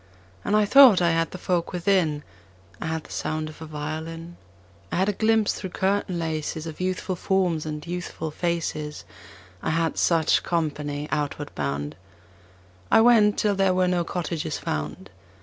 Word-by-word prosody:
And 205 Hz, -, +1 dB
I 215 Hz, 0 st, +4 dB
thought 255 Hz, -2 st, +8 dB
I 170 Hz, -1 st, +3 dB
had 165 Hz, 0 st, +1 dB
the -, -, -8 dB
folk 175 Hz, -2 st, -1 dB
within: 175 Hz, -5 st, +1 dB, 0.6 s
I -, -, -3 dB
had 160 Hz, -1 st, -2 dB
the -, -, -15 dB
sound 155 Hz, 0 st, -3 dB
of 155 Hz, -, -13 dB
a 160 Hz, -, -7 dB
violin; 160 Hz, +3 st, -6 dB, 0.6 s
I -, -, -1 dB
had 190 Hz, +3 st, +2 dB
a -, -, +1 dB
glimpse 220 Hz, +1 st, +2 dB
through 190 Hz, -, -6 dB
curtain 190 Hz, 0 st, 0 dB
laces 160 Hz, -1 st, -3 dB
Of 160 Hz, +1 st, -7 dB
youthful 185 Hz, 0 st, -2 dB
forms 180 Hz, -4 st, 0 dB
and 150 Hz, 0 st, -5 dB
youthful 175 Hz, -2 st, -5 dB
faces. 155 Hz, -3 st, -3 dB, 0.6 s
I -, -, -2 dB
had 165 Hz, 0 st, 0 dB
such 165 Hz, -2 st, +3 dB
company 150 Hz, -3 st, -2 dB
outward 145 Hz, -1 st, -2 dB
bound. 70 Hz, +1 st, -3 dB, 0.9 s
I -, -, +6 dB
went 225 Hz, -3 st, +5 dB
till 210 Hz, -1 st, +2 dB
there 195 Hz, -1 st, +2 dB
were 185 Hz, 0 st, +3 dB
no 180 Hz, -1 st, +1 dB
cottages 165 Hz, -2 st, -3 dB
found. 75 Hz, +5 st, -4 dB
165 Hz, 165 wpm, -25 LUFS, 155-185 Hz, 0.9 s, thought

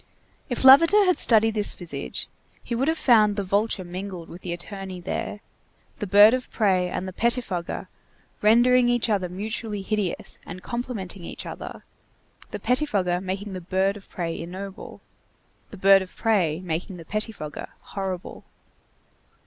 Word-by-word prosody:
If 245 Hz, -, -2 dB
Lavater 330 Hz, +10 st, +8 dB
had 365 Hz, -1 st, +3 dB
studied 225 Hz, -1 st, +5 dB
this 210 Hz, -1 st, +1 dB
visage, 175 Hz, -3 st, -5 dB, 0.4 s
he -, -, -5 dB
would 255 Hz, +4 st, 0 dB
have 320 Hz, +1 st, +1 dB
found 215 Hz, -7 st, +4 dB
the 200 Hz, -, -2 dB
vulture 200 Hz, +1 st, 0 dB
mingled 180 Hz, -1 st, -7 dB
with 175 Hz, -, -10 dB
the 180 Hz, -, -5 dB
attorney 190 Hz, +1 st, -6 dB
there, 190 Hz, +3 st, -4 dB, 0.6 s
the 210 Hz, -, -3 dB
bird 205 Hz, +4 st, +7 dB
of 255 Hz, -1 st, -2 dB
prey 185 Hz, -5 st, +1 dB
and 185 Hz, -, -4 dB
the 185 Hz, -, -6 dB
pettifogger 225 Hz, -6 st, -1 dB, 0.5 s
rendering 240 Hz, +3 st, +5 dB
each 240 Hz, -2 st, +1 dB
other 190 Hz, -4 st, 0 dB
mutually 210 Hz, +2 st, -4 dB
hideous 205 Hz, -3 st, -3 dB
and 180 Hz, +1 st, -9 dB
complementing 225 Hz, -7 st, -5 dB
each -, -, -7 dB
other; -, -, -8 dB, 0.7 s
the -, -, -5 dB
pettifogger 200 Hz, -10 st, 0 dB
making 195 Hz, +2 st, -4 dB
the 185 Hz, -, -5 dB
bird 190 Hz, +3 st, 0 dB
of 205 Hz, -, -13 dB
prey 170 Hz, -2 st, -4 dB
ignoble, 190 Hz, +3 st, -8 dB, 0.7 s
the 205 Hz, -, -10 dB
bird 195 Hz, +1 st, +6 dB
of 185 Hz, -, -9 dB
prey 185 Hz, -8 st, +1 dB
making 180 Hz, +2 st, -4 dB
the 165 Hz, -, -11 dB
pettifogger 215 Hz, -6 st, -4 dB
horrible. 190 Hz, -2 st, -6 dB
200 Hz, 150 wpm, -25 LUFS, 185-225 Hz, 0.7 s, Lavater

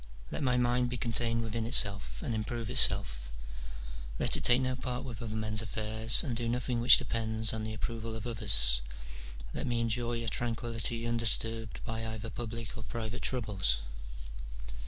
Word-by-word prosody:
Let -, -, -4 dB
my 125 Hz, -3 st, +1 dB
mind 125 Hz, 0 st, +1 dB
be 125 Hz, -, -4 dB
contained 115 Hz, -1 st, -1 dB
within 115 Hz, 0 st, -3 dB
itself 100 Hz, -, +6 dB
and -, -, -3 dB
improve 115 Hz, +1 st, -4 dB
itself: -, -, +2 dB, 0.9 s
let -, -, +3 dB
it -, -, -4 dB
take 125 Hz, +1 st, +4 dB
no 130 Hz, 0 st, -1 dB
part 125 Hz, 0 st, -4 dB
with 120 Hz, -4 st, -8 dB
other 110 Hz, -2 st, -5 dB
men's 110 Hz, 0 st, -1 dB
affairs, 110 Hz, +1 st, +4 dB
and 130 Hz, -7 st, -3 dB
do 115 Hz, 0 st, -2 dB
nothing 125 Hz, 0 st, -2 dB
which 125 Hz, +2 st, +8 dB
depends 110 Hz, -1 st, -2 dB
on 110 Hz, -1 st, -4 dB
the 110 Hz, 0 st, -5 dB
approval 115 Hz, 0 st, -5 dB
of 110 Hz, 0 st, -7 dB
others: -, -, +1 dB, 0.7 s
let -, -, -4 dB
me 120 Hz, -1 st, -1 dB
enjoy 115 Hz, 0 st, -2 dB
a -, -, -6 dB
tranquillity 115 Hz, 0 st, -3 dB
undisturbed 115 Hz, -1 st, -1 dB
by 115 Hz, 0 st, -4 dB
either 110 Hz, 0 st, -6 dB
public 115 Hz, 0 st, -6 dB
or 115 Hz, -, -8 dB
private 115 Hz, +1 st, -6 dB
troubles." 100 Hz, -, 0 dB
115 Hz, 165 wpm, -30 LUFS, 110-120 Hz, 0.9 s, which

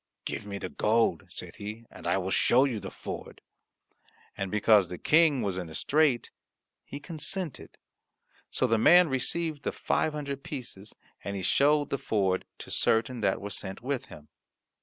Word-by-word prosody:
"Give -, -, -4 dB
me 100 Hz, -1 st, -4 dB
the 95 Hz, -, -5 dB
gold," 115 Hz, +4 st, +1 dB
said -, -, -7 dB
he, 110 Hz, +3 st, -7 dB
"and -, -, -9 dB
I -, -, +2 dB
will 95 Hz, 0 st, -2 dB
show 130 Hz, +7 st, +4 dB
you 120 Hz, -6 st, -2 dB
the 95 Hz, -, -7 dB
ford." -, -, -8 dB, 1.0 s
And 95 Hz, -1 st, -3 dB
because 105 Hz, -2 st, +4 dB
the 90 Hz, -, -6 dB
King 155 Hz, -, +4 dB
was 95 Hz, -3 st, -2 dB
in 90 Hz, -3 st, -5 dB
a 80 Hz, -, -9 dB
strait, 145 Hz, -5 st, +2 dB, 0.5 s
he 140 Hz, -, -8 dB
consented; 160 Hz, +1 st, -5 dB, 0.7 s
so -, -, 0 dB
the 115 Hz, -3 st, +2 dB
man 175 Hz, +7 st, +7 dB
received 150 Hz, +4 st, 0 dB
the -, -, -2 dB
five 155 Hz, -, 0 dB
hundred 140 Hz, -2 st, -4 dB
pieces, 120 Hz, -7 st, -7 dB, 0.3 s
and 100 Hz, +2 st, -4 dB
he 95 Hz, -, -4 dB
showed 145 Hz, -, +3 dB
the 140 Hz, -, -1 dB
ford 95 Hz, -5 st, 0 dB
to -, -, -9 dB
certain 115 Hz, +2 st, +2 dB
that 95 Hz, -2 st, +1 dB
were 100 Hz, +1 st, -6 dB
sent 95 Hz, +2 st, -6 dB
with 135 Hz, 0 st, -2 dB
him. 75 Hz, 0 st, -13 dB
115 Hz, 175 wpm, -28 LUFS, 100-145 Hz, 1.0 s, man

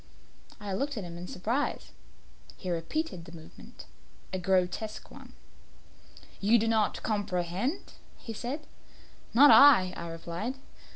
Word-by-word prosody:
I 205 Hz, -2 st, -5 dB
looked 275 Hz, +7 st, -2 dB
at 210 Hz, -, -3 dB
him 170 Hz, -1 st, -8 dB
in 175 Hz, +1 st, -7 dB
surprise. 230 Hz, +12 st, -2 dB, 0.7 s
He 185 Hz, -, -5 dB
repeated 175 Hz, -, -3 dB
the 165 Hz, -, -12 dB
movement 160 Hz, -1 st, -13 dB, 0.5 s
a 185 Hz, -, -1 dB
grotesque 190 Hz, +4 st, -1 dB
one. -, -, -13 dB, 1.1 s
"You 215 Hz, +4 st, +4 dB
do 225 Hz, 0 st, 0 dB
not 220 Hz, -2 st, +1 dB
comprehend?" 205 Hz, -, -2 dB, 0.2 s
he 225 Hz, -, -8 dB
said. 270 Hz, +8 st, -5 dB, 0.7 s
"Not 285 Hz, +4 st, +9 dB
I," 235 Hz, -11 st, +7 dB
I 170 Hz, -, -6 dB
replied. 170 Hz, +9 st, -5 dB
205 Hz, 125 wpm, -29 LUFS, 180-240 Hz, 1.1 s, Not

